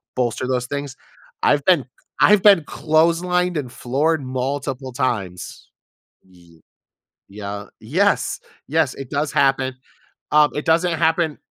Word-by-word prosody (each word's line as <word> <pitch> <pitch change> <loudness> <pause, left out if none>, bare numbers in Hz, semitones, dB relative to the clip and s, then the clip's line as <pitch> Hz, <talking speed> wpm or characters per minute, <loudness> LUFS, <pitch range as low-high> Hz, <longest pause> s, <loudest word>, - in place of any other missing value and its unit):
bolster 125 0 -1
those 125 -1 -1
things. 140 0 -5 0.5
I've 145 -1 +3
been 175 -8 +4 0.3
I've 210 -2 +5
been 200 -5 +7
clotheslined 170 +3 +1
and 130 -5 -4
floored 145 +6 0
multiple 130 +1 -3
times. 110 -9 -4 0.5
Ye 85 -3 -21 0.7
Yeah, 100 0 -7
yes. - - 0 0.3
Yes, 155 -2 +1
it 135 -3 -9
does 145 +1 -1
happen, 135 -1 +2 0.6
um, 150 0 +5
it 150 - -3
doesn't 170 +1 +2
happen 160 -1 +1
140 Hz, 120 wpm, -21 LUFS, 125-160 Hz, 0.7 s, been